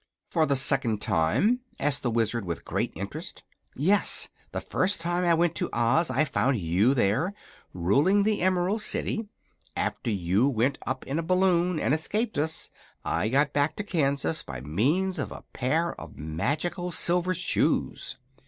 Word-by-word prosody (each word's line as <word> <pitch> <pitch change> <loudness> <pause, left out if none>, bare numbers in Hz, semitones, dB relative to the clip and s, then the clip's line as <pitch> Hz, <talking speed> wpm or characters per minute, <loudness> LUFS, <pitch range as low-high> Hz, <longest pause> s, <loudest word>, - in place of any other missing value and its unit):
"For 160 -2 +2
the 140 - +2
second 130 -4 +2
time?" 150 - +2 0.2
asked 145 0 +1
the 125 - -1
Wizard, 115 0 0
with 85 -3 -5
great - - -1
interest. - - -6 0.3
"Yes. 190 +9 +3 0.2
The - - -3
first 190 0 0
time 175 +2 -1
I 170 -1 +4
went 170 0 +2
to - - -1
Oz 120 +8 +2
I 155 +4 +2
found 125 0 +1
you 95 +8 +2
there, 130 - +1 0.4
ruling 140 - +2
the 215 0 +1
Emerald 185 +3 +1
City. 220 +1 -1 0.5
After - - -2
you 100 +5 +1
went 130 +2 0
up 130 +1 -3
in 140 +4 -2
a - - 0
balloon, 180 -1 +2
and 135 - +1
escaped 210 +5 -1
us, 160 +2 -1 0.3
I 110 - 0
got 140 +3 +2
back 145 +1 +1
to 205 - -4
Kansas 155 -4 0
by 65 -4 -7
means 145 - 0
of 140 - -3
a - - -9
pair 160 +7 0
of - - -11
magical 145 - -2
silver 180 +2 +1
shoes." 180 +2 0
150 Hz, 160 wpm, -27 LUFS, 120-180 Hz, 0.5 s, I